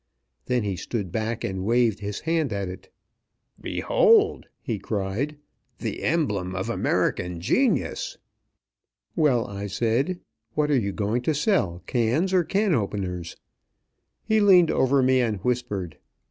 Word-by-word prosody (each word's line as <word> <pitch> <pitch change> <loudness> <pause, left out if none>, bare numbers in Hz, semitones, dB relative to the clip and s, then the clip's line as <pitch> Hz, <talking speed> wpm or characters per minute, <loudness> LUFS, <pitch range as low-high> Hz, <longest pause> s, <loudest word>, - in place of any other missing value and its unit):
Then 125 -2 +1
he 100 -3 -2
stood 95 +1 -4
back 110 +3 -2
and 95 -1 -3
waved 115 -1 +2
his 105 -1 -5
hand 160 -4 0
at 100 -1 -2
it. 90 +1 -9 0.7
"Behold!" 455 -4 +3
he 110 -4 -4
cried. 105 +9 -3 0.4
"The - - -4
emblem 105 - 0
of 95 - -2
American 90 -1 0
genius!" 275 - 0 1.0
"Well," 140 -8 +3
I 100 0 -5
said, 120 - 0 0.4
"what 150 -1 +1
are 140 - +4
you 100 -3 -2
going 105 +5 -1
to 155 +5 0
sell, 140 - 0
cans 130 +11 +1
or 180 -2 +4
can 195 +2 +1
openers?" 95 - -3 0.9
He 220 0 +2
leaned 185 -5 +6
over 130 +1 +3
me 130 0 +4
and 110 -4 0
whispered. 105 -9 -2
120 Hz, 135 wpm, -25 LUFS, 100-155 Hz, 1.0 s, leaned